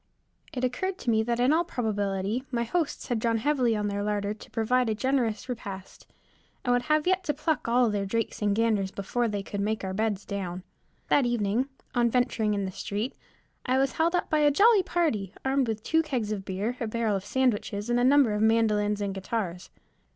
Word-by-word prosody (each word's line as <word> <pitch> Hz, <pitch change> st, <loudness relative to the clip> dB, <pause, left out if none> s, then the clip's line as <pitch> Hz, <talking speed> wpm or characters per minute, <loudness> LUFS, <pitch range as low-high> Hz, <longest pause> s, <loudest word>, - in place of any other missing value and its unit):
It 255 Hz, -, -4 dB
occurred 360 Hz, +10 st, -1 dB
to 240 Hz, -, -1 dB
me 220 Hz, -1 st, +3 dB
that 235 Hz, +1 st, -1 dB
in 250 Hz, +4 st, +4 dB
all 335 Hz, +2 st, +3 dB
probability 205 Hz, -, -2 dB
my 235 Hz, -2 st, 0 dB
hosts 310 Hz, +6 st, -2 dB
had 240 Hz, -2 st, 0 dB
drawn 230 Hz, 0 st, +1 dB
heavily 255 Hz, -2 st, +1 dB
on 210 Hz, -1 st, -1 dB
their 200 Hz, 0 st, -2 dB
larder 205 Hz, 0 st, -1 dB
to 215 Hz, -, -14 dB
provide 245 Hz, +2 st, +1 dB
a 215 Hz, -, 0 dB
generous 250 Hz, -2 st, 0 dB
repast, 200 Hz, -6 st, -7 dB, 0.6 s
and 245 Hz, -, +3 dB
would 245 Hz, +5 st, 0 dB
yet 305 Hz, 0 st, +3 dB
have -, -, -25 dB
to 325 Hz, -5 st, -1 dB
pluck 305 Hz, -1 st, -1 dB
all 240 Hz, -1 st, +3 dB
their 200 Hz, -1 st, -1 dB
drakes 230 Hz, +3 st, -2 dB
and 205 Hz, -1 st, +2 dB
ganders 215 Hz, -4 st, +1 dB
before 215 Hz, +5 st, -1 dB
they 205 Hz, -2 st, -3 dB
could 200 Hz, 0 st, -4 dB
make 215 Hz, +1 st, -1 dB
our 190 Hz, 0 st, -3 dB
beds 210 Hz, -1 st, -1 dB
down. 185 Hz, -3 st, -4 dB, 0.5 s
That 275 Hz, -4 st, +4 dB
evening, 240 Hz, +2 st, 0 dB, 0.2 s
on 240 Hz, -2 st, +3 dB
venturing 230 Hz, -3 st, +1 dB
in 200 Hz, -1 st, -1 dB
the 190 Hz, -, -4 dB
street, 205 Hz, +5 st, -4 dB, 0.5 s
I 255 Hz, +1 st, +2 dB
was 270 Hz, 0 st, +2 dB
held 335 Hz, +2 st, +1 dB
up 355 Hz, -, 0 dB
by 310 Hz, -, +1 dB
a 295 Hz, -1 st, +5 dB
jolly 410 Hz, +8 st, +5 dB
party, 300 Hz, -, -1 dB
armed 265 Hz, -1 st, +2 dB
with 220 Hz, -1 st, -3 dB
two 320 Hz, 0 st, +3 dB
kegs 255 Hz, -9 st, -2 dB
of 200 Hz, -3 st, -4 dB
beer, 205 Hz, +6 st, -2 dB
a 230 Hz, -, -2 dB
barrel 220 Hz, -1 st, 0 dB
of 195 Hz, -, -3 dB
sandwiches, 210 Hz, -3 st, 0 dB
and 240 Hz, 0 st, +2 dB
a -, -, +2 dB
number 265 Hz, -3 st, +5 dB
of 210 Hz, -, -1 dB
mandolins 210 Hz, -2 st, +2 dB
and 200 Hz, -1 st, -2 dB
guitars. 190 Hz, -2 st, -4 dB
225 Hz, 210 wpm, -27 LUFS, 205-260 Hz, 0.6 s, a